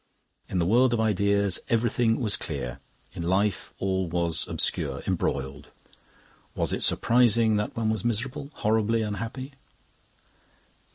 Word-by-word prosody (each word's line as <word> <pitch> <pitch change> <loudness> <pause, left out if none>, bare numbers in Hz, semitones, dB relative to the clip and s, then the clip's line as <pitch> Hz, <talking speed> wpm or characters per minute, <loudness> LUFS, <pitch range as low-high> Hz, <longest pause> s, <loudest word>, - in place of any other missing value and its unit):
In 95 - -2
the 85 - +2
world 120 +6 +4
of - - -2
ideas 100 -2 +2
everything 115 0 +2
was 110 -5 +2
clear; 70 -4 -5 0.3
in - - -6
life 95 +4 0
all 95 -1 -1
was 85 -1 -1
obscure, - - -1
embroiled. 70 +1 -2 0.9
Was - - 0
it - - -2
surprising 115 -2 +4
that 105 +2 -3
one 110 -1 +1
was 110 -4 -2
miserable, 130 +5 -2
horribly 110 +1 +1
unhappy? 115 +6 -5
105 Hz, 125 wpm, -26 LUFS, 95-115 Hz, 0.9 s, world